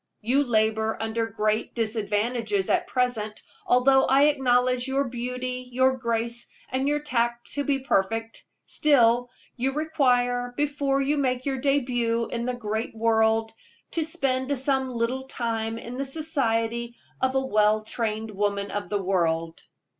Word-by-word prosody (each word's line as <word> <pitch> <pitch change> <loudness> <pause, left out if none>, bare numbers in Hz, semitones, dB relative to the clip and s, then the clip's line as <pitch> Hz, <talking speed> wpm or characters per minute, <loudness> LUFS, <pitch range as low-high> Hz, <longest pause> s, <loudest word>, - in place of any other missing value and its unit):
You 255 +6 +2
labor 220 -2 +1
under 225 +1 -1
great 215 0 -1
disadvantages 215 -2 -1
at - - +1
present, 235 -4 -1 0.2
although 265 -1 +5
I 275 +1 +4
acknowledge 255 -3 +2
your 270 +1 +1
beauty, 250 0 -4
your 260 +1 +3
grace, 235 -1 -1 0.2
and 260 +2 0
your 295 0 +1
tact 240 -4 -1
to 285 - -1
be 275 -1 0
perfect; 225 -1 -1 0.2
still, 245 -4 +3 0.3
you 265 +2 0
require, 245 -5 +1
before 285 -2 0
you 290 +2 +1
make 255 -2 0
your 270 -2 -1
debut 245 -4 +1
in 235 0 -3
the 250 - -1
great 220 -1 -3
world, 225 0 +2 0.4
to 330 - 0
spend 270 -3 -1
some 265 0 0
little 250 +3 -2
time 225 -3 -2
in 240 +2 -7
the 275 - -2
society 235 -6 -1 0.3
of 260 0 +1
a - - +4
well 215 -2 +3
trained 220 -1 -3
woman 200 0 -1
of 205 - -4
the 205 -2 -1
world." 165 -3 0
245 Hz, 145 wpm, -26 LUFS, 225-265 Hz, 0.4 s, although